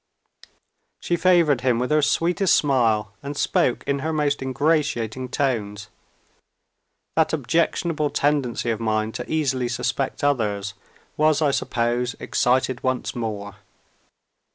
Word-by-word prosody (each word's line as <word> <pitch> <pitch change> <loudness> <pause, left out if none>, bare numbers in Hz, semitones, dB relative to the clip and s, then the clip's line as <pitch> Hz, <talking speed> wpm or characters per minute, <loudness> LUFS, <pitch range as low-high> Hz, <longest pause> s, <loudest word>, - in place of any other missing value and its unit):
She 175 - -1
favored 170 -7 +3
him 125 -2 +2
with 125 +4 -2
her 155 0 +4
sweetest 175 +5 +2
smile, 115 -7 +1
and 140 +1 -6
spoke 125 - +1
in 140 0 0
her 160 +4 -2
most 150 -2 0
ingratiating 130 -3 0
tones. 105 -7 -2 1.3
That 160 0 +2
objectionable 155 +2 0
tendency 140 -6 0
of 110 - -3
mine 110 -1 0
to - - -6
easily 135 -5 0
suspect 135 +4 -2
others 105 -8 0 0.4
was, 155 0 +3
I 150 -3 +2
suppose, 120 -1 -1
excited 130 0 +1
once 130 -1 -2
more. 105 -4 -5
130 Hz, 120 wpm, -23 LUFS, 115-150 Hz, 1.3 s, her